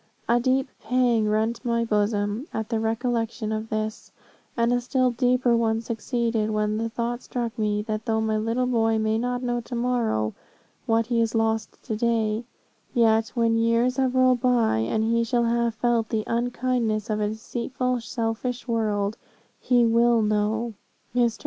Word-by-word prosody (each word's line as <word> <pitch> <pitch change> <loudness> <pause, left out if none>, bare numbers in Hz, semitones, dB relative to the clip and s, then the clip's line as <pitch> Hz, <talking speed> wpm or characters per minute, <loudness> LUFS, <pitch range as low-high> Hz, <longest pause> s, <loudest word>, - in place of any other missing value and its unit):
A 240 +1 +3
deep 260 +2 +1
pang 240 -1 +2
rent 220 +3 0
my 235 -1 0
bosom 210 +3 0
at 220 -1 -4
the 225 -2 0
recollection 225 0 -1
of 220 0 -3
this, 215 0 -4 0.5
and 235 +1 +2
a 245 - +1
still 255 +1 +1
deeper 245 0 +2
one 225 -1 +1
succeeded 230 -1 -1
when 215 0 0
the 230 0 -1
thought 235 +2 -3
struck 240 -2 -4
me, 210 -2 0
that 215 0 -4
though 220 -1 +1
my 220 0 0
little 230 +4 0
boy 225 -3 +2
may 220 0 +1
not 245 +1 -2
know 240 -1 -1
to 240 +1 -7
morrow 235 - 0 0.5
what 225 0 +2
he 235 0 0
has 230 0 0
lost 225 -1 0
to 220 - -3
day, 225 0 0 0.5
yet 225 -1 +4
when 230 -1 +2
years 230 +3 +2
have 260 -1 +1
rolled 255 -2 +4
by, 240 - +2
and 215 - 0
he 230 +1 +2
shall 235 +1 +1
have 235 0 +1
felt 235 -1 +1
the 220 -2 -1
unkindness 235 -2 -1
of 215 - 0
a 210 - +1
deceitful, 245 +3 -3
selfish 230 +2 -3
world, 215 -2 0 0.4
he 245 -2 +3
will 235 0 +4
know. 215 +2 0 0.4
"Mr. 240 -2 +2
230 Hz, 170 wpm, -25 LUFS, 220-240 Hz, 0.5 s, yet